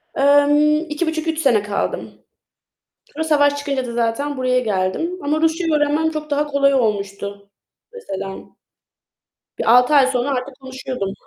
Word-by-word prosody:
Emm, 290 +2 +4
2,5-3 320 +1 -2
sene 235 -9 +3
kaldım. 205 -1 -3 1.0
Sonra 315 +2 -3
savaş 290 -2 +2
çıkınca 280 -2 -2
da 235 - -6
zaten 240 +5 -1
buraya 255 -1 +1
geldim 215 - -2
ama 300 +2 0
Rusçayı 325 0 +1
öğrenmem 300 +2 +1
çok 305 -1 -6
daha 295 +1 0
kolay 280 -1 +2
olmuştu 200 -4 -2 0.4
mesela. 195 - -6 1.2
Bir 235 +2 +5
6 250 +4 +3
ay 270 -2 +6
sonra 255 0 -1
artık 260 0 -3
konuşuyordum. 260 -6 -5
280 Hz, 135 wpm, -20 LUFS, 235-300 Hz, 1.2 s, ay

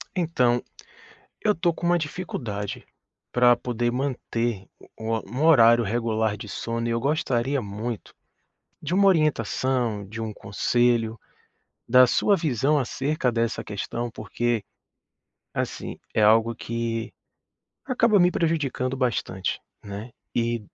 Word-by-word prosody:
Então, 125 -9 +2 0.8
eu 210 -1 +2
tô 170 -1 +1
com 170 +1 -4
uma 175 0 +4
dificuldade 120 - -4 0.5
pra 120 0 +5
poder 120 0 -1
manter 120 -5 -2 0.3
u 115 0 -1
um 130 +5 -3
horário 120 -7 +7
regular 110 -1 0
de 105 - -9
sono 115 0 -3
e - - 0
eu 115 0 0
gostaria 135 -1 0
muito 105 +2 -5 0.7
de 155 +3 -3
uma 200 +1 +5
orientação, 130 - +1
de 110 +4 -8
um 110 -1 -4
conselho, 115 +1 +1 0.7
da 125 +1 +7
sua 200 - +3
visão 150 - +1
acerca 135 +1 -1
dessa 115 0 -1
questão, 115 +4 -4
porque, 115 +1 -2 0.9
assim, - - -4 0.2
é - - +2
algo 110 +2 +5
que 115 -1 -3 0.7
acaba 235 -5 +3
me 180 0 +5
prejudicando 145 -7 0
bastante, 115 -7 -1 0.2
né, 105 +4 -7 0.2
eh 115 0 +1
120 Hz, 120 wpm, -25 LUFS, 115-140 Hz, 0.9 s, horário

